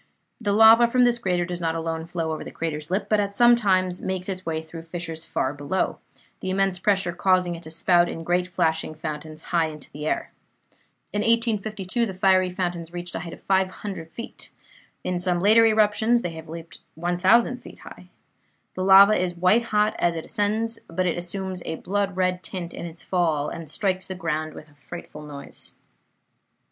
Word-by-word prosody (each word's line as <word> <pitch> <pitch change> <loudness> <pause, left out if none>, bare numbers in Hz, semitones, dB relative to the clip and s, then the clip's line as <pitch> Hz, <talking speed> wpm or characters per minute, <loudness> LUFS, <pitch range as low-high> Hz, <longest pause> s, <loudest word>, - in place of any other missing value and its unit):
The 205 -3 0
lava 225 +3 +7
from 250 +1 +3
this 240 -1 +3
crater 180 -5 0
does 175 0 -5
not 165 -1 0
alone 165 0 -3
flow 165 -2 -2
over 155 - -4
the - - -8
crater's 155 -2 -4
lip, 190 +3 0
but 215 - +2
at 200 0 -1 0.2
times 185 -4 +1
makes 185 -1 -3
its 185 -2 -4
way 160 -2 -3
through 160 +1 -9
fissures 165 -1 -5
far 130 - -1
below, 145 +6 -2 0.4
the 190 - -4
immense 190 -1 +1
pressure 195 -2 +1
causing 180 0 +2
it 170 - -8
to 160 - -10
spout 175 +2 +3
in 165 - -6
great 180 +1 +1
flashing 160 -3 0
fountains 155 0 -6
high 165 -2 +3
into 150 -2 -10
the 150 +1 -5
air. - - -2 0.8
In 205 - 0
1852 220 -1 0
the 190 - -6
fiery 185 -1 +3
fountains 175 -2 -3
reached 175 -1 -6
a - - -3
height 170 0 -7
of - - -13
500 190 -2 -1
feet. 230 +8 -9 0.5
In 180 -1 -1
some 180 -1 0
later 220 +4 +6
eruptions 220 +2 +3
they 175 - -2
have 160 -1 -10
leaped 165 0 -9 0.2
1,000 185 +9 +3
feet - - -12
high. - - -12 0.7
The 185 - -3
lava 195 +2 +8
is 180 -3 0
white 185 +7 +3
hot 210 -1 +1
as 170 -1 +2
it 160 - -5
ascends, 225 +2 -1
but 185 +2 -1
it 175 - +1
assumes 185 +1 -5
a 160 - -3
blood 195 +1 -2
red 185 -1 +1
tint 175 -2 -6
in 170 - -6
its 165 +1 -10
fall, 160 -5 0
and 165 -3 -7
strikes 185 +2 -1
the 190 - -5
ground 155 -3 -3
with 155 - -10
a 150 - -22
frightful 150 +1 -10
noise. 145 -2 -9
180 Hz, 190 wpm, -24 LUFS, 165-200 Hz, 0.8 s, lava